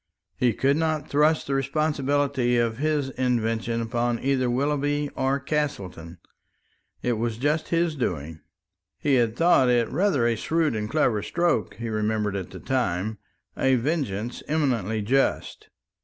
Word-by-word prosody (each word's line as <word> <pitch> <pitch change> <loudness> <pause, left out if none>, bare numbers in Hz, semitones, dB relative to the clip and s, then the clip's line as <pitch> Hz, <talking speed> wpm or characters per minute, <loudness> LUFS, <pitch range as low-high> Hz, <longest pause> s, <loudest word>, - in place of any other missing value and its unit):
He 125 -3 +2
could 140 +6 +2
not 155 -2 -1
thrust 150 +2 +2
the 140 - -2
responsibility 140 -2 +1
of 115 0 0
his 150 -2 0
invention 115 -2 -1
upon 120 +1 -1
either 130 -2 +1
Willoughby 145 +3 0
or 135 +1 0
Castleton; 100 - -3 0.9
it 120 -3 0
was 115 -1 -2
just 150 +5 0
his 170 -1 +1
doing. 80 - -3 0.6
He 145 - 0
had 115 -3 +2
thought 150 -4 +4
it 120 -2 +3
rather 160 -6 +1
a 120 -1 +2
shrewd 160 +3 0
and 105 0 -3
clever 120 -7 +1
stroke, 170 - 0
he 115 +1 -5
remembered 105 -1 -1
at 95 -3 -4
the - - -9
time 110 -4 -1 0.4
a 130 0 +3
vengeance 120 - -2
eminently 120 - 0
just. 135 +6 0
130 Hz, 140 wpm, -25 LUFS, 110-145 Hz, 0.9 s, thought